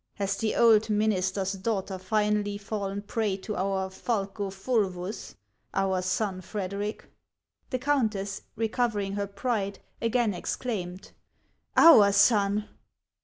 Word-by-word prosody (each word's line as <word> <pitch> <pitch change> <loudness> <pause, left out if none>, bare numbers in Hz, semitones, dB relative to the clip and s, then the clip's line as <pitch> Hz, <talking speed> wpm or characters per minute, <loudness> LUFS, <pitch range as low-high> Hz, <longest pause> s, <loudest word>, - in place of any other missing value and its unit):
Has 200 -1 -1
the 220 +1 -1
old 225 -2 +5
minister's 195 -2 +1
daughter 195 -1 -2
finally 210 +1 0
fallen 200 -1 -4
a - - -3
prey 205 -1 -1
to 210 +2 -5
our 190 0 -1
falco 200 -1 -2
fulvus, 195 -2 -2 0.4
our 190 -1 +1
son 185 +1 -1
Frederic 200 +2 -4 0.3
?" - - -48
The 255 - -1
countess, 225 -8 0
recovering 220 -3 -1
her 200 0 -2
pride, 200 -1 -2 0.2
again 230 -2 +1
exclaimed: 185 -1 -4 0.7
"Our 220 -12 +8
son!" 205 0 +3
205 Hz, 120 wpm, -27 LUFS, 195-220 Hz, 0.7 s, Our